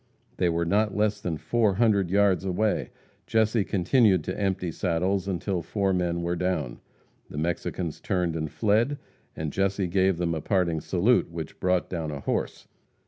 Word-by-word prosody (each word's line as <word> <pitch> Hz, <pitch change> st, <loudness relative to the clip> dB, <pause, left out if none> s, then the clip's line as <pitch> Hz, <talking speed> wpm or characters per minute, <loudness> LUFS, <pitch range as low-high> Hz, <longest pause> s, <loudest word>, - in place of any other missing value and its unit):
They 90 Hz, -, +2 dB
were 85 Hz, 0 st, 0 dB
not 105 Hz, +3 st, +1 dB
less 105 Hz, -1 st, +1 dB
than 85 Hz, -4 st, -2 dB
four 110 Hz, +1 st, +1 dB
hundred 100 Hz, -4 st, +3 dB
yards 100 Hz, -2 st, +3 dB
away. 100 Hz, +3 st, 0 dB, 0.4 s
Jesse 110 Hz, -1 st, +2 dB
continued 95 Hz, -, +3 dB
to 90 Hz, -, -4 dB
empty 95 Hz, -3 st, -1 dB
saddles 90 Hz, +2 st, 0 dB
until 95 Hz, -1 st, -2 dB
four 95 Hz, +3 st, 0 dB
men 85 Hz, -1 st, -1 dB
were 85 Hz, +1 st, -1 dB
down. 85 Hz, -8 st, -2 dB, 0.5 s
The -, -, -8 dB
Mexicans 85 Hz, +1 st, -2 dB
turned 90 Hz, -4 st, -1 dB
and 80 Hz, -1 st, -2 dB
fled, 115 Hz, -, +1 dB, 0.4 s
and 80 Hz, -2 st, -4 dB
Jesse 95 Hz, 0 st, 0 dB
gave 95 Hz, 0 st, +2 dB
them 85 Hz, -1 st, 0 dB
a 80 Hz, -, -3 dB
parting 85 Hz, -3 st, 0 dB
salute, 95 Hz, +9 st, +2 dB
which 80 Hz, -2 st, -7 dB
brought 90 Hz, -1 st, +1 dB
down 80 Hz, -4 st, -4 dB
a 70 Hz, -2 st, -5 dB
horse. -, -, -3 dB
90 Hz, 165 wpm, -26 LUFS, 85-100 Hz, 0.5 s, hundred